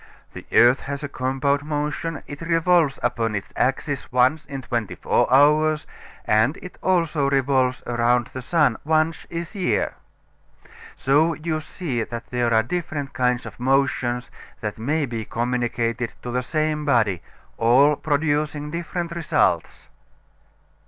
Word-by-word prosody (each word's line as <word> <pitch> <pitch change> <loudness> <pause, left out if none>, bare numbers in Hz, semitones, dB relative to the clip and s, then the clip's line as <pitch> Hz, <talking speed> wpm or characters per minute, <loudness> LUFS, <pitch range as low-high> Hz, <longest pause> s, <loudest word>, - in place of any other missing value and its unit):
The - - -10
earth 120 +2 +6
has 140 +1 -5
a - - -2
compound 140 +1 -1
motion. 150 +1 -3
It 145 +2 -9
revolves 165 -3 +2
upon 115 -3 0
its 100 - -5
axis 135 +2 -1
once 130 +5 +2
in 135 -2 -6
twenty 120 -5 -3
four - - +1
hours, 150 +3 +4 0.4
and 110 +7 +2
it 180 - -11
also 165 -6 +1
revolves 130 -2 +1
around 120 0 +2
the 130 - -5
sun 145 -3 +2
once 155 +1 0
each 170 +2 -5
year. 190 -4 0 1.0
So 155 +5 +2
you 155 0 -2
see 150 -6 -4
that 115 +1 -6
there 120 -1 0
are 110 -1 +4
different 150 -1 -4
kinds 125 -1 0
of - - -10
motion 125 -2 +1 0.4
that 105 0 -5
may 145 +6 0
be 115 -3 -4
communicated 120 0 -2
to 125 - -4
the 125 +1 0
same 155 +2 -1
body 115 - +2 0.4
all 130 +6 +5
producing 150 0 -1
different 170 +1 -4
results. 170 -1 0
140 Hz, 140 wpm, -23 LUFS, 120-155 Hz, 1.0 s, earth